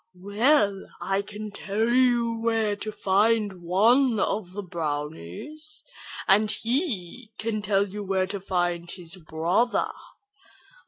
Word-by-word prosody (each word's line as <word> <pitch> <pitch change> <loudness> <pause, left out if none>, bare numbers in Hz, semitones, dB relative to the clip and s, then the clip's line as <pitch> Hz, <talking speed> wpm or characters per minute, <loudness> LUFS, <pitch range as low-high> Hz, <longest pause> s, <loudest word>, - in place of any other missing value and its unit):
"Well, 205 +1 +2
I 195 +1 0
can 210 +1 -7
tell 205 +3 -1
you 240 -2 +3
where 225 -2 +1
to 215 +1 -5
find 205 -1 +2
one 225 +7 +4
of 190 -2 -1
the 205 +1 -5
brownies, 155 - -5 0.4
and 210 +2 +5
he 230 - -2
can 220 -1 -2
tell 200 0 +2
you 205 +2 -6
where 190 -1 +1
to 200 +1 -5
find 175 -2 -1
his 175 0 -6
brother. 175 +8 0
205 Hz, 120 wpm, -26 LUFS, 185-230 Hz, 0.4 s, and